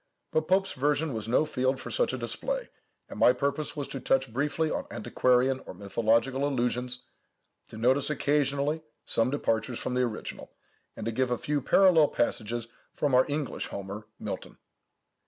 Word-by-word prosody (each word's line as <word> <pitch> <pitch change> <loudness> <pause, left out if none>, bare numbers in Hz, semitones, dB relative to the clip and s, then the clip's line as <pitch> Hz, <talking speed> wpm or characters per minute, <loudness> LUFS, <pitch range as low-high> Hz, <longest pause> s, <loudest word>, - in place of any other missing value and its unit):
But 155 0 +1
Pope's 190 +1 +2
version 145 +2 0
was 110 -1 -4
no 125 +6 +3
field 130 -2 0
for - - -7
such - - +1
a - - -3
display; - - -3 0.4
and - - -9
my 125 - +7
purpose 140 +4 -1
was 145 - -2
to 135 - -4
touch 135 -2 +1
briefly 150 +4 0
on - - -3
antiquarian 130 +1 +2
or - - -8
mythological 115 +7 +1
allusions, 125 -1 -1 0.6
to - - -10
notice 130 +6 +2
occasionally 145 +1 +1 0.2
some 115 +2 +2
departures 115 -4 -1
from - - -3
the 125 - +2
original, 120 -4 -4 0.5
and 110 - -6
to 115 - 0
give 130 +2 0
a 125 - 0
few 145 +4 -1
parallel 165 +1 +5
passages 115 -1 -1 0.3
from 145 -3 0
our 130 +1 +5
English 145 -1 -2
Homer, 100 +2 -7
Milton. - - -6
130 Hz, 165 wpm, -28 LUFS, 120-145 Hz, 0.6 s, my